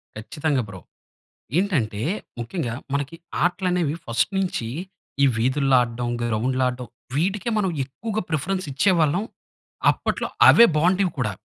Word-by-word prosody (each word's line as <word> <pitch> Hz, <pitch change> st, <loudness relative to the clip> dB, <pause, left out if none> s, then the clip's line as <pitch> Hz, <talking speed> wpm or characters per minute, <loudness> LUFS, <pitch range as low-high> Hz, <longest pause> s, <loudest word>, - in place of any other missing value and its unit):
ఖచ్చితంగా 140 Hz, +6 st, -1 dB
బ్రో. 95 Hz, -3 st, -9 dB, 0.8 s
ఏంటంటే, 125 Hz, -, 0 dB, 0.4 s
ముఖ్యంగా 120 Hz, 0 st, -3 dB, 0.2 s
మనకి 145 Hz, +3 st, -2 dB, 0.3 s
ఆటలు 180 Hz, +1 st, +1 dB
అనేవి 165 Hz, -4 st, 0 dB
ఫస్ట్ 115 Hz, -, 0 dB
నుంచీ, 180 Hz, -12 st, -1 dB, 0.6 s
ఈ -, -, +8 dB
వీధుల్లో 130 Hz, +3 st, +2 dB
ఆడ్డం, 120 Hz, 0 st, -4 dB
గ్రౌండ్‌లో 120 Hz, +3 st, 0 dB
ఆడ్డం. 125 Hz, 0 st, -4 dB, 0.3 s
వీటికే 190 Hz, +8 st, 0 dB
మనం 200 Hz, -3 st, +1 dB
ఎక్కువగా 215 Hz, -, -4 dB
ప్రిఫరెన్స్ 185 Hz, +5 st, -1 dB
ఇచ్చేవాళ్ళం. 175 Hz, +2 st, +2 dB, 0.7 s
అప్పట్లో -, -, -2 dB, 0.2 s
అవే 235 Hz, -, +9 dB
బాగుండేవి 180 Hz, +4 st, +2 dB
కూడా. 105 Hz, -5 st, 0 dB
145 Hz, 120 wpm, -23 LUFS, 120-185 Hz, 0.8 s, అవే